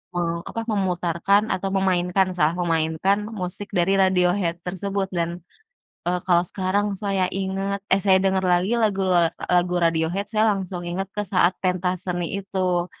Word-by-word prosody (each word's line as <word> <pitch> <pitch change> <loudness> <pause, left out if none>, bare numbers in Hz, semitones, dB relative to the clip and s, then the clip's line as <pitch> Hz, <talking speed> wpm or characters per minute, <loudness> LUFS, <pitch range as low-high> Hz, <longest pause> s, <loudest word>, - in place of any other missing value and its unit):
meng 170 -1 0 0.2
apa, 230 - -4
memutarkan 185 0 +1
atau 195 +1 -2
memainkan 185 0 +2
salah 160 0 +2
memainkan 165 +3 +1 0.2
musik 180 +3 -5
dari 175 +2 +2
Radiohead 180 -2 +2
tersebut. 195 +2 -2
Dan, 170 0 0 0.8
eee, 180 +1 0
kalau 175 -2 +4
sekarang 200 +3 -1
saya 195 -2 +1
ingat, 195 +1 -2
eh - - +5
saya 190 -1 +6
dengar 190 -1 +1
lagi, 180 +1 +2
lagu 210 -4 +1
la 175 -3 +2 0.2
lagu 180 0 +2
Radiohead, 165 +4 +1
saya 215 0 +2
langsung 185 -2 -5
inget 185 +3 -3
ke 210 - -1
saat 180 -1 +2
pentas 180 -1 -1
seni 175 -1 -2
itu. 185 -3 -1
185 Hz, 150 wpm, -23 LUFS, 175-195 Hz, 0.8 s, saya